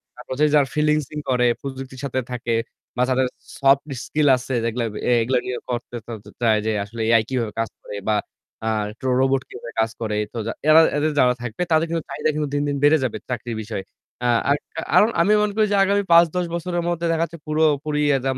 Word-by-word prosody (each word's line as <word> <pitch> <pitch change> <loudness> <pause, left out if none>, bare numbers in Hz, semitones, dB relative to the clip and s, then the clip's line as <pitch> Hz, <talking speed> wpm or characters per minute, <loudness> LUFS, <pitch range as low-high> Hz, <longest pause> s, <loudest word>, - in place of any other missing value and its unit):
তারপর - - -7
যে 150 - +5
যার 145 -2 +5
ফ্রিলান্সিং 150 -1 0
করে, 125 -1 +2 0.2
প্রযুক্তির 130 -1 -7
সাথে 130 -1 -1
থাকে 120 -1 -2 0.4
বা 125 - +1
যাদের 130 0 +2 0.3
সফট 140 +2 +3 0.2
স্কিল 150 -1 +1
আছে 130 +1 -6
যেগুলো 115 +1 -1 0.3
এ - - +4
এগুলো 125 +3 +1
গিয়ে 125 - -3
করতে-তরতে 115 -3 -6
চায় 110 -2 +3
যে 110 - +1
আসলে 115 +3 -7
AI 115 -1 +6
কিভাবে 115 -5 -2
কাজ 115 - 0
করে 105 - -8
বা 110 - +3 0.5
আ - - +2 0.3
ট্রো 130 - -2
রোবট 135 0 +2
কিভাবে 120 -1 -9
কাজ 110 0 +2
করে। 105 -2 -2 0.2
তো - - -6
যা - - -1 0.2
এরা 160 +1 +8 0.2
এদের 155 +1 +1
যারা 125 -1 +5
থাকবে 120 +4 -5
তাদের 160 0 +4
কিন্তু 165 -1 -2
চাহিদা 150 - -1
কিন্তু 150 -1 -1
দিনদিন 145 0 0
বেড়ে 150 +2 +6
যাবে 125 - -2
চাকরির 120 -2 -4
বিষয়ে। 105 -2 -5 0.4
আ - - +3 0.2
আরক 145 +1 +2 0.3
আরোন 215 - +6
আমি 205 +5 +4
মনে 210 -1 0
করি 215 -1 +3
যে - - +3
আগামী 200 +1 +2
৫-১০ 170 +1 +5
বছরের 175 0 -2
মধ্যে 170 0 -2
দেখা 165 0 +1
যাচ্ছে 170 0 -5
পুরোপুরি 150 -1 +1 0.2
একদম 130 0 -2
135 Hz, 205 wpm, -22 LUFS, 120-155 Hz, 0.5 s, এরা